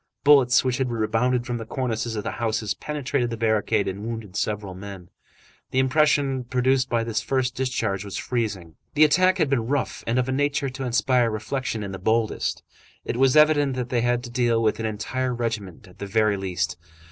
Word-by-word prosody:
Bullets 140 -4 +6
which 130 -2 0
had 130 -2 0
rebounded 120 +2 0
from 120 -1 -3
the - - -5
cornices 120 -3 -2
of 105 - -3
the - - -3
houses 110 -3 0
penetrated 140 -1 -2
the 115 - -4
barricade 110 -1 +1
and 95 +2 -4
wounded 110 -4 -6
several 105 -2 -2
men. 95 -1 -10 0.6
The - - -4
impression 135 -1 +2
produced 130 +1 +1
by 115 -1 +1
this 115 -2 -1
first 130 -2 0
discharge 115 -7 -2
was 100 -1 -6
freezing. 100 -10 -3 0.2
The 150 - +6
attack 185 +5 +4
had 160 -5 +2
been 125 -5 0
rough, 140 +1 -2
and 115 +2 +1
of 130 0 +1
a - - -1
nature 145 0 0
to 130 0 -5
inspire 125 -1 +2
reflection 110 +1 -3
in 100 - -5
the 95 - -6
boldest. 110 +3 0 0.4
It - - -3
was 135 +2 +4
evident 145 -3 +4
that 125 -1 -3
they 120 -2 +1
had 120 0 +1
to 120 - -8
deal 120 -2 +2
with 110 0 +1
an 110 - -1
entire 125 +4 -2
regiment 110 -7 -4
at 90 - -18
the 100 - -5
very 105 0 +2
least. 90 -4 -2
120 Hz, 200 wpm, -24 LUFS, 110-130 Hz, 0.6 s, Bullets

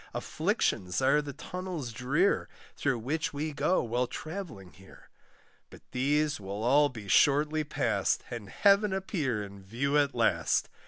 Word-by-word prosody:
Afflictions 90 -1 -1
are 135 +3 +3
the 145 -1 -6
tunnels 180 -4 -6
drear, 140 - +1 0.3
Through 135 -4 0
which 145 +6 -2
we 150 +1 -3
go 180 +5 +1
while 120 +1 0
travelling 155 - -7
here; 95 +1 -17 0.6
But - - -15
these 145 +3 +1
will 100 +2 -5
all 145 +4 +4
be 115 -6 -9
shortly 150 +8 +3
past, 145 - 0
And 115 -4 -6
heaven 200 0 +3
appear 150 - -1
in 100 -1 -10
view 135 +9 0
at 140 -2 +1
last. 115 - +1
140 Hz, 145 wpm, -29 LUFS, 115-155 Hz, 0.6 s, all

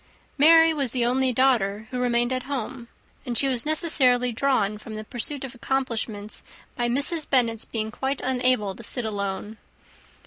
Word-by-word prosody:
Mary 325 +2 +6
was 275 -6 -2
the 245 -2 +1
only 255 +1 +1
daughter 220 -5 +1
who 250 - -3
remained 240 0 +1
at 255 - -2
home; 260 -3 -5 0.4
and 245 -3 -3
she 275 - +4
was 255 +1 -1
necessarily 265 -6 +2
drawn 220 -5 0
from 215 0 -9
the 215 - -6
pursuit 255 +5 -2
of 265 - -7
accomplishments 230 -5 -3 0.3
by 240 -1 -1
Mrs. 285 +5 +1
Bennet's 230 -4 +2
being 220 -1 -4
quite 265 +4 -3
unable 250 -5 +1
to 210 - -12
sit 235 +1 +1
alone. 205 0 -4
245 Hz, 165 wpm, -24 LUFS, 220-270 Hz, 0.4 s, Mary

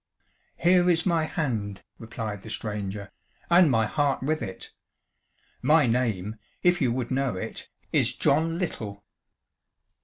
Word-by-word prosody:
"Here 180 +1 +4
is 165 -2 +3
my 165 -4 +2
hand," 110 - -3 0.2
replied 110 -3 -5
the 110 - -10
stranger, 105 -2 -4 0.4
"and 175 -2 +7
my 115 -3 +3
heart 140 +4 0
with 155 +3 0
it. 95 -2 -7 0.9
My 155 -1 +5
name, 115 -4 0 0.3
if 175 0 +3
you 125 -3 +3
would 125 0 -2
know 135 -4 0
it, 90 - -6 0.2
is - - +2
John 160 +4 +2
Little." 105 - -4
125 Hz, 130 wpm, -26 LUFS, 105-160 Hz, 0.9 s, and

